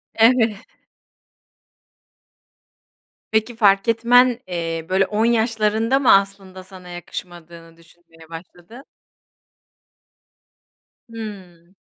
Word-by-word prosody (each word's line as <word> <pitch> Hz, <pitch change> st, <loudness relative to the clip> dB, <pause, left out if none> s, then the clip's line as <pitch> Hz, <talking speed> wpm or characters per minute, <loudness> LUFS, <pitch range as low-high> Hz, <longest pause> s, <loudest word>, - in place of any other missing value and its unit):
Evet. 225 Hz, -1 st, +3 dB, 2.8 s
Peki, 220 Hz, +2 st, -1 dB
fark 200 Hz, -3 st, +3 dB
etmen, 240 Hz, +2 st, +3 dB
eee, 165 Hz, -2 st, -4 dB
böyle, 190 Hz, +1 st, +2 dB
10 215 Hz, +3 st, -1 dB
yaşlarında 225 Hz, +1 st, 0 dB
mı 275 Hz, -, +4 dB
aslında 195 Hz, -1 st, -1 dB
sana 185 Hz, -1 st, -14 dB
yakışmadığını 170 Hz, -1 st, -10 dB
düşünmeye 165 Hz, -1 st, -21 dB
başladın? 175 Hz, +8 st, -13 dB, 2.3 s
Hıı. 190 Hz, -6 st, -11 dB
195 Hz, 75 wpm, -20 LUFS, 175-225 Hz, 2.8 s, mı